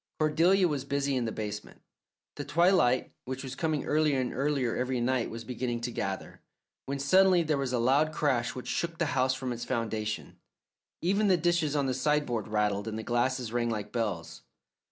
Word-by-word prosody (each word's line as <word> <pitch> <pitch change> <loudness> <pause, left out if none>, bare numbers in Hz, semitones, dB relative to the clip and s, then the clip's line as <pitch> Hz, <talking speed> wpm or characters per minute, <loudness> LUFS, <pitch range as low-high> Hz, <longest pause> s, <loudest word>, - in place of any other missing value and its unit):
Cordelia 170 +5 +3
was 145 -5 -2
busy 140 0 -1
in 125 -2 0
the 110 - -2
basement; 105 -1 -6 0.5
the - - -5
twilight, 165 -8 +3
which 130 +1 -5
was 130 -1 -6
coming 155 0 -1
earlier 150 -2 +2
and 125 -1 -2
earlier 135 -3 0
every 130 0 -1
night, 125 0 0
was 115 0 -7
beginning 120 0 -3
to 120 +1 -3
gather, 95 -4 -4 0.5
when 140 +1 -2
suddenly 180 +5 +4
there 155 -3 0
was 135 -2 -1
a 125 - +1
loud 135 +6 +3
crash 130 -6 0
which 125 - -6
shook 170 -1 -2
the 170 - +1
house 130 0 +2
from 130 -1 -3
its 120 - -6
foundations. 110 -3 -3 0.7
Even 200 +4 +2
the 185 -2 +4
dishes 170 -3 +1
on 140 -2 +1
the 130 - 0
sideboard 130 -5 0
rattled, 105 -1 0
and 110 0 -3
the 110 - -4
glasses 120 0 0
rang 120 -1 +1
like 105 -2 -4
bells. 105 -8 -3
130 Hz, 190 wpm, -29 LUFS, 120-150 Hz, 0.7 s, suddenly